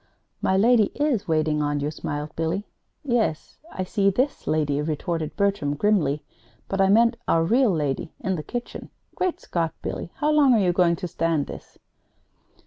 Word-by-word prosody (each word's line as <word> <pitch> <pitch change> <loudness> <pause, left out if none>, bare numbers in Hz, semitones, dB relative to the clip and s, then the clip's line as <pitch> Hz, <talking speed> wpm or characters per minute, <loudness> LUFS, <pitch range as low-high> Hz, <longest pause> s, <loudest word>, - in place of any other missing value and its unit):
"My 190 - +2
lady 225 +1 +5
is 290 -8 0
waiting 155 -2 +1
on 145 0 0
you," 145 +1 -2
smiled 150 0 -5
Billy. 165 +5 -2 0.4
"Yes, 235 - -1
I 185 - -3
see 200 +1 +1
this 255 +9 -1
lady 150 -2 +1
is," 150 - -2
retorted 160 0 -3
Bertram, 195 -8 0
grimly; 150 -5 +1 0.4
"but 195 0 0
I 190 - +4
mean 230 +4 +5
our 165 - +3
real 240 +8 +3
lady 150 -3 -1
in 190 -1 -1
the 160 - -4
kitchen. 240 +10 -6 0.2
Great 370 -1 -1
Scott, 165 -2 -2
Billy, 170 - -5
how 300 +1 +1
long 285 -5 +5
are - - +3
you 180 -3 +2
going 175 -1 +3
to 180 - -5
stand 165 -3 0
this?" - - -11
180 Hz, 175 wpm, -24 LUFS, 155-215 Hz, 0.4 s, lady